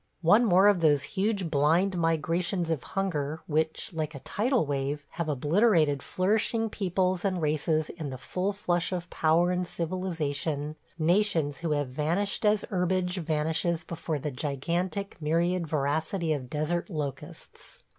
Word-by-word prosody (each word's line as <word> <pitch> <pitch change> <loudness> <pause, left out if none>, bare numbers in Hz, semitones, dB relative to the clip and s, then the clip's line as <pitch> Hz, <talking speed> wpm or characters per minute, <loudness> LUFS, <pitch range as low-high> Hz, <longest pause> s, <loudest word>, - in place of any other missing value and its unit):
One 210 +9 +6
more 190 -1 +5
of 205 -3 +4
those 145 -4 +3
huge, 195 -4 -1
blind 165 +7 +3
migrations 165 +1 0
of 155 -5 -1
hunger 160 -5 -2
which, 160 +2 -1
like 155 -1 -3
a - - -6
tidal 235 - +1
wave, 140 +1 -2
have 170 -2 -4
obliterated 155 - +3
flourishing 220 - 0
peoples 185 -2 0
and 190 -3 0
races 155 0 0
in 160 -5 -6
the 130 - -6
full 180 +9 -2
flush 180 -4 -1
of 175 -1 -4
power 165 +3 +3
and 180 0 -1
civilization, 160 -4 -2 0.2
nations 165 -3 +1
who 165 -3 -1
have 145 -3 -1
vanished 170 - -1
as 210 0 +3
herbage 180 0 0
vanishes 160 +1 0
before 165 -2 -3
the 145 +1 -4
gigantic, 170 +9 -2
myriad 170 +3 +1
voracity 155 +3 0
of 130 -4 -5
desert 160 - -1
locusts. 150 0 -7
165 Hz, 145 wpm, -28 LUFS, 150-185 Hz, 0.2 s, One